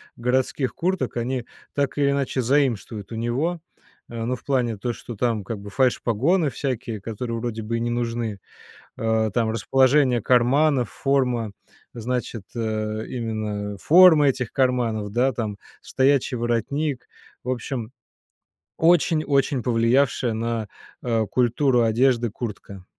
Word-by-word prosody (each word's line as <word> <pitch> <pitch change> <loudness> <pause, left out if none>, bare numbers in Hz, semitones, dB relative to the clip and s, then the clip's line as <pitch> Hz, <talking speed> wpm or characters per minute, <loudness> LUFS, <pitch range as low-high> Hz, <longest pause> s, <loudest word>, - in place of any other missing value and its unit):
городских 130 +2 0
курток 175 -9 -1
они 125 +1 -2 0.3
так 140 -1 -1
или 140 -1 +3
иначе 140 -2 -1
заимствуют 120 -5 0
у - - -5
него, 130 +10 -1 0.5
а, 115 -1 -4
ну, 125 +2 -1
в - - -15
плане 125 -5 0
то, 120 +4 -2
что 120 - -9
там 115 -1 0
как 110 +3 -5
бы 100 +1 -9
фальш-погоны 135 - +2
всякие, 120 -6 -4
которые 115 +2 -4
вроде 115 -1 -4
бы 115 +2 -2
и - - -2
не 120 - -1
нужны, 115 -3 -2 0.6
а, 110 -1 +1
там 115 +1 +1
расположение 130 +3 +3
карманов, 125 +2 +3
форма, 125 -5 0 0.4
значит, 120 -2 -3
э, 110 -1 -2
именно 105 -4 -4
форма 160 - +7
этих 125 -3 -2
карманов, 120 -5 0
да, 125 +4 +2
там, 110 -3 -3 0.2
стоячий 135 -1 +1
воротник, 120 +4 -1 0.4
в 125 - -5
общем, 120 -2 -3 0.9
очень 165 -1 +3
очень 140 -3 +1
повлиявшая 120 +1 +2
на, 115 -1 -2 0.3
а, 115 -3 0
культуру 125 +3 +2
одежды 120 +1 +2
куртка. 100 -4 -7
120 Hz, 135 wpm, -23 LUFS, 115-135 Hz, 0.9 s, форма